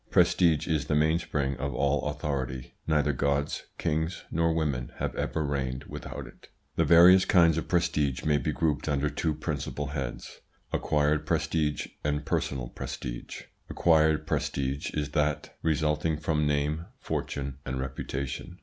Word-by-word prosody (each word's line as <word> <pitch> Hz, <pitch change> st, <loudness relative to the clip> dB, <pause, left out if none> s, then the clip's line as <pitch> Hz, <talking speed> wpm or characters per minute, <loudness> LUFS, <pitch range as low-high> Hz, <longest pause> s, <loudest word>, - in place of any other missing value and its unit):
Prestige 85 Hz, -4 st, +4 dB
is 80 Hz, -4 st, +1 dB
the -, -, 0 dB
mainspring 75 Hz, -3 st, +1 dB
of 70 Hz, +2 st, -3 dB
all 75 Hz, +1 st, +1 dB
authority. 65 Hz, -4 st, -3 dB
Neither 75 Hz, -2 st, +2 dB
gods, 70 Hz, +2 st, -1 dB
kings, 80 Hz, +1 st, -1 dB
nor 85 Hz, 0 st, +2 dB
women 75 Hz, -6 st, -1 dB
have -, -, -2 dB
ever 80 Hz, -2 st, -1 dB
reigned 65 Hz, -2 st, -2 dB
without -, -, -7 dB
it. -, -, -15 dB, 0.3 s
The -, -, +2 dB
various 90 Hz, +2 st, +8 dB
kinds 85 Hz, -3 st, +5 dB
of 80 Hz, -, -2 dB
prestige 75 Hz, -6 st, +1 dB
may 75 Hz, -1 st, +3 dB
be 65 Hz, -, -1 dB
grouped 75 Hz, -2 st, 0 dB
under 75 Hz, +1 st, +1 dB
two 75 Hz, +1 st, -1 dB
principal 75 Hz, -2 st, -3 dB
heads: 70 Hz, -4 st, -5 dB, 0.3 s
acquired 75 Hz, 0 st, +1 dB
prestige 75 Hz, -3 st, 0 dB, 0.2 s
and 75 Hz, 0 st, -1 dB
personal 65 Hz, -3 st, -1 dB
prestige. -, -, -6 dB, 0.3 s
Acquired 80 Hz, -2 st, +3 dB
prestige 70 Hz, 0 st, -1 dB
is 75 Hz, -1 st, -1 dB
that 75 Hz, 0 st, 0 dB
resulting 75 Hz, 0 st, +1 dB
from 75 Hz, -1 st, 0 dB
name, 75 Hz, +3 st, 0 dB
fortune, 70 Hz, -1 st, -4 dB
and 65 Hz, 0 st, -3 dB
reputation. 70 Hz, +5 st, -4 dB
75 Hz, 140 wpm, -28 LUFS, 70-80 Hz, 0.3 s, various